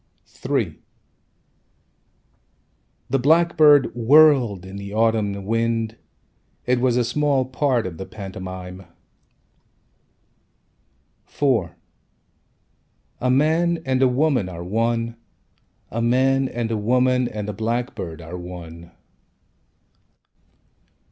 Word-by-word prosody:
III - - -1 2.3
The 135 - +2
blackbird 155 0 +4
whirled 120 - +4
in 95 +1 -9
the 100 0 -7
autumn 110 -3 0
wind 115 0 -1 0.7
It 125 0 +1
was 125 -1 +2
a 125 - +2
small 140 +2 +1
part 130 -2 0
of 85 -3 -7
the 95 - -6
pantomime. 95 -2 -8 2.4
IV 115 - 0 1.5
A 125 - 0
man 160 +6 +2
and 130 -1 0
a 130 - +5
woman 125 -6 +1
Are 85 -1 -7
one. 115 +4 -1 0.7
A 115 - -2
man 130 +3 +2
and 115 -1 -3
a 110 - 0
woman 125 +3 +2
and 105 -3 -5
a 105 - -4
blackbird 110 -7 -4
Are 85 +3 -7
one. 85 -1 -10
115 Hz, 95 wpm, -22 LUFS, 100-130 Hz, 2.4 s, a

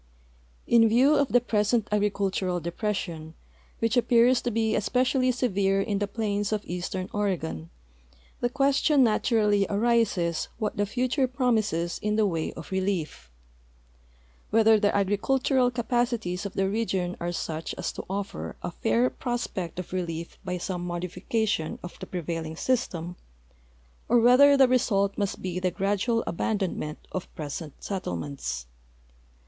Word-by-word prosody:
In 230 -1 +5
view 255 +6 +5
of 285 -2 +3
the 245 - +4
present 220 -1 +1
agricultural 200 -3 0
de})ression, 170 -2 -4 0.4
which 230 +2 0
a])j)ears 245 +1 +4
to 245 - -1
be 220 -1 0
especially 255 +4 +2
severe 200 -6 +1
in 200 0 -1
the 205 - -1
})lains 205 -2 -1
of 210 -1 -1
eastern 180 +1 -4
Oregon, 160 - -2 0.7
the 245 - 0
(ques 275 +2 +2
tion 295 -4 +4
naturally 215 -3 +2
arises 205 -6 +1
what 215 -1 -2
the 205 -1 0
future 255 +4 0
promises 220 - 0
in 210 0 0
the 215 -1 +3
wa}'^ 165 -4 -2
of - - -9
re 190 0 0
lief; 165 - -3 1.2
whether 220 0 +5
the 205 -1 +2
agricultural 245 +6 +2
capacities 235 -6 -1
of 195 - -11
the 195 0 +1
region 190 -4 -1
are 175 +1 -2
such 160 -2 -4
as - - -3
to - - -7
offer 190 - -4
a - - -3
fair 115 +3 +1
])ros])ect 235 -9 -4
of 180 0 -6
relief 170 -2 -4
b}'^ 180 -1 -3
some 175 0 -3
modification 180 +1 -2
of 175 - -9
the - - -7
prevailing 165 -2 -4
system 175 -7 -2 0.9
or 240 - +5
whether 265 +4 +7
the 265 -1 +6
result 200 -6 +2
must 200 -2 -3
be 180 -1 -2
the 185 0 +1
gradual 205 +5 0
abandonment 175 -5 -2
of 185 - -5
present 150 -1 -6
settlements. 140 - -4
205 Hz, 140 wpm, -27 LUFS, 175-235 Hz, 1.2 s, whether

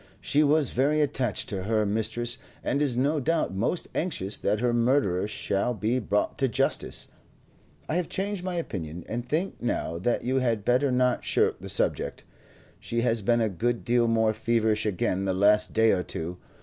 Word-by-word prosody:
"She 145 - +2
was 150 -2 +3
very 145 +5 +2
attached 135 -6 0
to 95 -3 -3
her 110 0 +1
mistress, 115 +4 -1 0.2
and 140 - 0
is 135 -5 +1
no 145 +4 +2
doubt 160 - 0
most 115 - 0
anxious 110 - -2
that 105 +1 0
her 120 0 +1
murderer 120 -6 +2
shall 105 +2 -1
be 115 +4 0
brought 105 -2 -1
to 135 - +3
justice. 115 - -1 0.8
I 160 - 0
have 180 - -2
changed 195 -1 -3
my 185 -1 -3
opinion, 90 - -5
and 120 +2 -3
think 160 +10 -2
now 85 -8 -2
that 120 +7 0
you 130 +2 0
had 115 -5 0
better 130 +3 +3
not 125 0 +1
shirk - - +1
the - - -7
subject. - - -1 0.6
She 115 0 -2
has 115 -2 +1
been 115 +3 +2
a 110 - +2
good 115 +5 -2
deal 120 -1 +3
more 110 -1 +2
feverish 110 -1 +1
again 95 -1 -1
the 95 -1 0
last 105 +2 +4
day 110 0 +4
or 90 - +1
two. 90 0 -5
120 Hz, 185 wpm, -27 LUFS, 105-135 Hz, 0.8 s, last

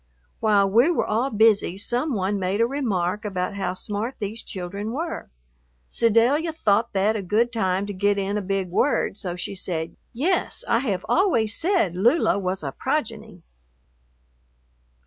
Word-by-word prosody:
While 205 -2 +3
we 235 - +4
were 350 - +1
all 230 +5 0
busy 215 -5 +3
some 245 +7 -1
one 195 +1 -1
made 190 +2 -1
a 230 - +4
remark 210 -7 -1
about 185 -2 -2
how 190 -2 -3
smart 210 +6 -3
these 215 +2 -4
children 200 +4 -5
were. 325 +4 -4 0.6
Sedalia 240 - +2
thought 225 -6 +1
that 205 +3 +2
a 210 - -2
good 220 +6 +1
time 190 -3 0
to 205 - -5
get 200 +1 +1
in 200 +1 -1
a 210 - 0
big 195 -1 -2
word, 270 +5 +1
so 185 -4 -4
she 180 - -4
said, 170 -4 -4 0.2
"Yes, 325 +10 0
I 230 - +3
have 200 -8 -2
always 235 - +2
said 335 - +1
Lula 230 - +3
was 185 -2 -3
a 135 - -3
progeny." 220 - -3
210 Hz, 160 wpm, -24 LUFS, 190-235 Hz, 0.6 s, we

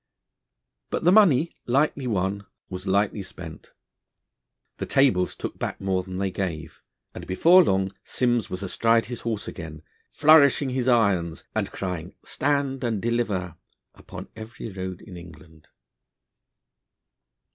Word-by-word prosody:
But - - -3
the 175 - +5
money, 170 -7 +5 0.2
lightly 135 +1 +1
won, 100 -1 -2 0.2
was 95 +1 -6
lightly 100 +2 +1
spent. 90 -4 -10 1.1
The - - -3
tables 125 -10 +2
took - - -6
back - - -3
more 95 -1 0
than 95 0 -8
they 95 0 -1
gave, 80 -4 -5 0.3
and - - -9
before 170 - +6
long 95 - +1
Simms 120 -4 0
was 90 +2 -5
astride 115 +4 +2
his 120 -1 -6
horse 110 -3 -3
again, 80 -3 -8 0.3
flourishing 145 -3 +5
his 130 -1 -1
irons, 100 -9 +2
and - - -2
crying: 90 -2 -5
'Stand 140 -2 -1
and 115 -4 -1
deliver'! 100 -7 -2 0.4
upon - - -10
every 110 0 -8
road 95 -1 -6
in 95 -4 -10
England. 80 -2 -14
100 Hz, 130 wpm, -25 LUFS, 90-125 Hz, 1.1 s, before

